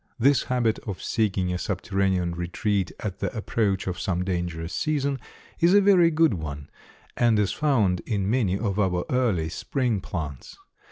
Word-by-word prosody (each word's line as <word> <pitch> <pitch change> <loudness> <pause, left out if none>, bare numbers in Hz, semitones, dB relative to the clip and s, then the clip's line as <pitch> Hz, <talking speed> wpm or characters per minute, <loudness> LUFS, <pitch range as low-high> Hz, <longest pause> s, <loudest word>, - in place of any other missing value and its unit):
This 135 +4 +3
habit 120 -3 +1
of 100 -5 -6
seeking 95 -5 0
a 90 - -2
subterranean 95 -3 0
retreat 90 +3 -1
at 100 -3 -4
the 100 -2 -2
approach 105 -3 0
of 90 -2 -3
some 90 -1 -1
dangerous 85 -2 -3
season 140 -3 0 0.4
is 175 +4 +5
a - - +8
very 190 -4 +5
good 160 -4 +3
one, 75 -5 -6 0.4
and 120 -2 +3
is 105 -2 +2
found 110 - +2
in 100 -4 -1
many 105 -5 +1
of 100 -2 -2
our 90 -3 +1
early 115 -11 +1
spring 120 - -1
plants. 75 -9 -6
100 Hz, 160 wpm, -25 LUFS, 90-125 Hz, 0.4 s, a